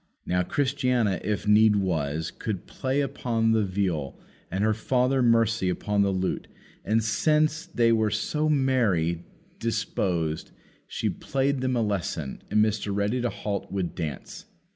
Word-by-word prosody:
Now, 90 0 +1
Christiana, 125 -4 +1
if 105 +1 -2
need 105 0 +6
was, 80 -5 -1
could 105 -5 -5
play 135 +2 -1
upon 115 -4 0
the 110 -1 +3
viol, 90 -8 -2 0.3
and 95 +3 -1
her 110 0 +3
daughter 125 +4 +1
Mercy 115 -4 +3
upon 100 +3 0
the 100 - +3
lute; 95 -1 -2 0.4
and, 110 +1 +1
since 155 +8 +1
they 120 -9 +2
were 110 -1 +3
so 150 +9 0
merry 110 - +1 0.4
disposed, 90 -8 -1 0.4
she - - -2
played 135 0 -1
them 130 -1 0
a 115 - +2
lesson, 85 -9 -3
and 105 0 +4
Mr. 105 -1 -2
Ready 105 +5 0
to 120 - 0
halt 100 -3 -4
would 95 -3 -2
dance. 80 -5 -6
110 Hz, 145 wpm, -26 LUFS, 95-125 Hz, 0.4 s, need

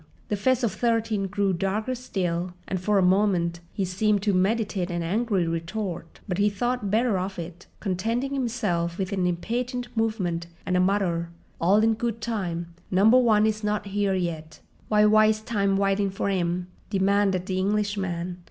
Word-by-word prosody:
The 210 - +1
face 255 +5 +1
of 230 - +2
Thirteen 225 -3 0
grew 200 0 0
darker 200 +7 -1
still, 180 -7 -3
and 185 -2 -2
for 205 +2 +2
a 190 - +4
moment 180 -3 +2
he 195 - -1
seemed 200 +2 +1
to 205 -1 +2
meditate 195 -1 +1
an 175 -1 -2
angry 200 +1 0
retort; 165 +1 -4
but 180 -1 -2
he 205 +1 +4
thought 240 +1 -2
better 220 -1 +2
of 190 +1 -4
it, 170 +1 -8
contenting 225 +8 -1
himself 205 -10 -1
with 190 0 -2
an 185 -2 +1
impatient 245 +8 -3
movement 190 -7 -1 0.2
and 185 - 0
a - - +4
mutter: 180 -3 +1 0.3
"All 200 +6 +4
in 225 0 +4
good 230 0 -2
time; 175 -7 -3 0.2
Number 215 +7 +5
One 215 -4 +4
is 215 0 -1
not 210 0 -1
here 200 -1 0
yet." 160 -3 -4 0.3
"W'y 210 0 +5
wyste 215 0 +4
time 200 -4 +1
w'itin' 195 0 +1
for 195 +1 -1
'im?" 180 -1 -1 0.2
demanded 195 -2 +2
the 185 -1 -1
Englishman. 190 -3 -1
200 Hz, 170 wpm, -25 LUFS, 180-215 Hz, 0.3 s, Number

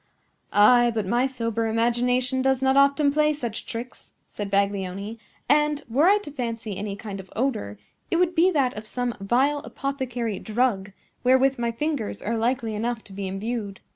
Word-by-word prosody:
"Ay; 240 +4 +6
but 215 -3 0
my 240 +7 +2
sober 230 -3 -2
imagination 245 +3 +1
does 265 -1 +2
not 265 0 +3
often 280 +1 +4
play 300 +1 +3
such 240 -7 -5
tricks," 235 +2 -8
said 205 -1 -6
Baglioni; 200 +2 -1 0.3
"and, 295 +1 +2
were 275 +8 +3
I 405 +2 +6
to 290 - -8
fancy 230 -6 -4
any 200 +1 -4
kind 200 -1 -7
of 190 -1 -11
odor, 220 - -1 0.3
it - - 0
would 355 0 +2
be 345 +2 +4
that 275 -8 +1
of 215 +1 -7
some 245 +1 -2
vile 260 +9 +2
apothecary 250 -7 -3
drug, 215 -3 0 0.3
wherewith 260 +1 +4
my 235 -1 0
fingers 280 -2 -3
are 230 - -2
likely 230 -1 0
enough 230 +2 -2
to 195 - -14
be 195 0 -4
imbued. 200 +1 -4
240 Hz, 170 wpm, -25 LUFS, 210-270 Hz, 0.3 s, Ay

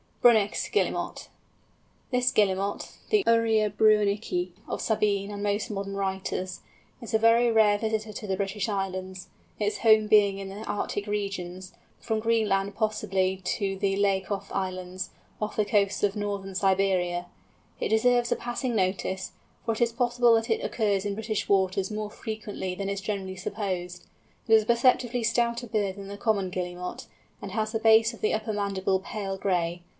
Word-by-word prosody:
BRUNNICH'S 220 -4 +4
GUILLEMOT. - - -1 0.8
This 250 0 +2
Guillemot, 200 -1 0 0.2
the 425 -2 +3
Uria 225 -2 +3
bruennichi 205 -3 +2 0.2
of - - -3
Sabine 205 -2 0
and 205 0 -6
most 205 +1 -1
modern 195 -1 -4
writers, 190 -1 -3 0.4
is 230 -1 -3
a - - +4
very 230 +1 +5
rare 210 -2 +4
visitor 220 -1 -2
to 210 - -7
the 190 -1 -1
British 200 +2 -2
Islands, 190 -2 -4 0.3
its 210 0 -1
home 220 -2 +5
being 205 -2 +5
in 195 -1 -6
the 200 +3 -7
Arctic 205 0 -3
regions, 190 -3 -4 0.3
from 220 -1 -1
Greenland 210 -3 +1
possibly 195 -4 0
to 195 +1 -1
the 195 0 0
Liakoff 195 0 0
Islands, 185 -1 -3 0.3
off 210 - -2
the 215 - +2
coasts 205 -1 +1
of 205 0 +2
northern 200 -2 -3
Siberia. 185 -2 +1 0.5
It - - -1
deserves 240 +2 +3
a - - +4
passing 240 0 -3
notice, 190 -1 -1 0.3
for 230 - +1
it 220 - -6
is 235 -1 +3
possible 240 0 +3
that 225 +1 0
it 225 - 0
occurs 205 -4 0
in 205 -1 -2
British 215 0 -3
waters 190 -1 +2
more 210 0 -4
frequently 210 -5 -5
than 195 +1 -3
is 200 0 -3
generally 195 -2 -4
supposed. 180 -2 -4 0.4
It 225 - +3
is 220 -1 +7
a - - -16
perceptibly 245 0 +3
stouter 235 +1 +1
bird 205 -4 -1
than 200 -1 -9
the 200 0 -7
Common 205 -4 0
Guillemot, 180 0 -5 0.3
and 200 - -6
has 215 0 -1
the 225 - -1
base 225 +1 +5
of 230 - -13
the 215 - +1
upper 220 0 -3
mandible 195 -2 0
pale 195 -1 -5
gray. 175 -3 -1
205 Hz, 165 wpm, -27 LUFS, 190-220 Hz, 0.8 s, is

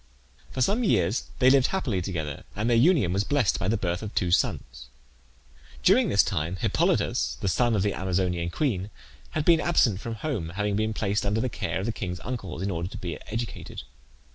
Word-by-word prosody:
For 130 - 0
some 215 - +1
years 95 - +1
they 130 0 +5
lived 135 -2 +5
happily 130 - -1
together, 80 -6 -4
and 105 +3 -1
their 120 - +3
union 125 - +4
was 100 +1 +1
blessed 135 -5 +1
by 90 - -2
the 110 +3 +2
birth 90 -3 -2
of 105 -1 -7
two 90 -4 +1
sons. 65 -7 -1 1.0
During 215 +3 +5
this 100 - +5
time 85 -3 -2
Hippolytus, 65 -7 0
the - - -2
son 115 +6 +2
of 100 - +1
the 105 - +1
Amazonian 90 -2 -1
queen, 100 - -1 0.5
had 155 - -1
been 165 -2 +5
absent 120 - +2
from 115 +1 -5
home, 110 - -3
having 105 0 0
been 110 +1 0
placed 105 -1 -1
under 105 +2 0
the 125 - 0
care - - -3
of - - -3
the 115 - 0
king's 90 -5 -5
uncles 100 -8 -5
in 100 - -1
order 85 0 -3
to - - -8
be 85 -2 -5
educated. 115 +1 -5
105 Hz, 200 wpm, -26 LUFS, 90-120 Hz, 1.0 s, they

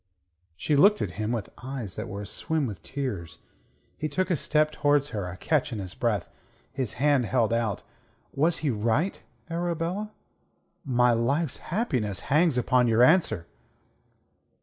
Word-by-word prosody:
She 150 - 0
looked 205 +9 +6
at 95 - -3
him 110 +2 -1
with 115 -4 -3
eyes 130 -7 -5
that 110 +2 -5
were 100 0 -6
aswim 160 +8 -1
with 105 -6 -6
tears. 120 - -4 0.6
He 155 - -2
took 185 +6 -1
a - - +4
step 155 +1 +2
towards 145 -1 +2
her, 100 -8 -3
a 90 - -8
catch 150 - 0
in 115 - -4
his 95 -2 -6
breath, 105 -6 -1 0.5
his 130 -4 -2
hand 140 -2 +2
held 115 -2 +2
out. 115 -4 -1 0.5
"Was 160 +4 +2
he 140 - +3
right, 115 - 0 0.3
Arabella? 175 +4 -2 0.7
My 125 -2 +3
life's 135 +6 0
happiness 125 - -2
hangs 155 -3 +4
upon 125 0 +3
your 115 +1 +4
answer." 155 - +3
130 Hz, 150 wpm, -27 LUFS, 110-155 Hz, 0.7 s, looked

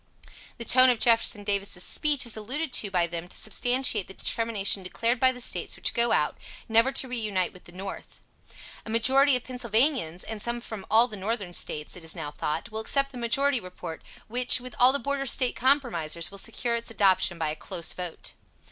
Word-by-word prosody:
The 235 - -6
tone 255 +2 +6
of 245 - +3
Jeff. 230 -1 +5
Davis' 200 -3 -1
speech 295 -4 +2
is 235 - -3
alluded 260 +8 -3
to 205 - +1
by 180 -3 +1
them 170 0 -6
to - - -4
substantiate 245 -5 +1
the 190 - -12
determination 220 -4 +1
declared 230 +6 -1
by 260 0 +4
the 250 - -9
States 245 - -1
which - - 0
go 235 0 +2
out, - - 0 0.3
never 230 +3 +3
to 270 -1 +1
reunite 215 -7 -1
with 180 - -17
the - - -15
North. 190 +2 -9 0.6
A - - -10
majority 265 +5 +4
of 250 - -1
Pennsylvanians, 240 - 0
and 220 -2 -6
some 235 +2 -2
from 220 -4 -9
all 230 +2 +5
the 215 -4 -7
Northern 200 -2 -3
States, 150 -3 -1
it 180 - -10
is 160 - -4
now 145 - -5
thought, 155 +8 -4
will 220 - -4
accept 275 +4 +1
the 250 - -9
majority 260 +3 +1
report, 180 -4 -9 0.3
which, 245 +2 +1
with 255 0 -10
all 250 +1 +7
the 280 - +1
Border 280 +1 -3
State 250 0 +1
compromisers, 225 - 0
will 200 - -3
secure 235 +3 -2
its 235 0 -3
adoption 190 -5 +2
by 160 -2 -1
a 155 - -3
close 170 +1 -4
vote. 180 -2 -5
230 Hz, 200 wpm, -26 LUFS, 190-250 Hz, 0.6 s, all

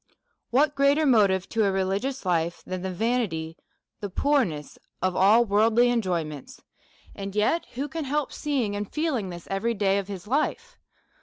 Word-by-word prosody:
What 285 +4 +3
greater 280 +2 +3
motive 200 -7 +3
to 225 -1 +1
a 200 - +2
religious 195 +7 -2
life 170 -1 0
than 185 -1 -4
the 190 - -3
va 230 +7 0
nity, 160 -7 -3 0.4
the 205 - -4
poorness 190 - 0 0.2
of 185 -1 0
all 215 +6 +5
worldly 225 +4 +3
enjoyments; 170 - -3 0.5
and 195 0 -7
yet 215 +11 +1
who 275 +4 -2
can 315 +1 -5
help 290 +1 -1
seeing 255 -9 -1
and 205 0 -4
feeling 295 - -1
this 175 -1 -9
every 230 +4 0
day 200 -1 +2
of 195 - -5
his 195 -2 -7
life? 450 - -2
210 Hz, 165 wpm, -26 LUFS, 190-265 Hz, 0.5 s, all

